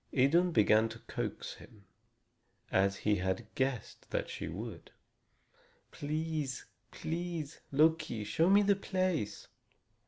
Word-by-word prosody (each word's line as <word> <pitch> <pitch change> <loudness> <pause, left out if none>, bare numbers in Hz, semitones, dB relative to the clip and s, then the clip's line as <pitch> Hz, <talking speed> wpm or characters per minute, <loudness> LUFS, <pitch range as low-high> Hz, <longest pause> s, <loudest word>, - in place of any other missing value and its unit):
Idun 165 +7 +4
began 110 -3 +5
to 110 - -8
coax - - -4
him, 105 -3 -16 0.9
as 100 +1 +3
he 105 -1 +4
had 95 +4 -1
guessed 130 -3 -2
that - - -2
she - - -4
would: - - -7 1.0
"Please, 155 -2 -2 0.2
please, 165 -3 -4
Loki, 155 -6 +3
show 160 - +2
me 200 +1 +6
the 200 0 +4
place!" 185 - -1
145 Hz, 115 wpm, -33 LUFS, 110-165 Hz, 1.0 s, me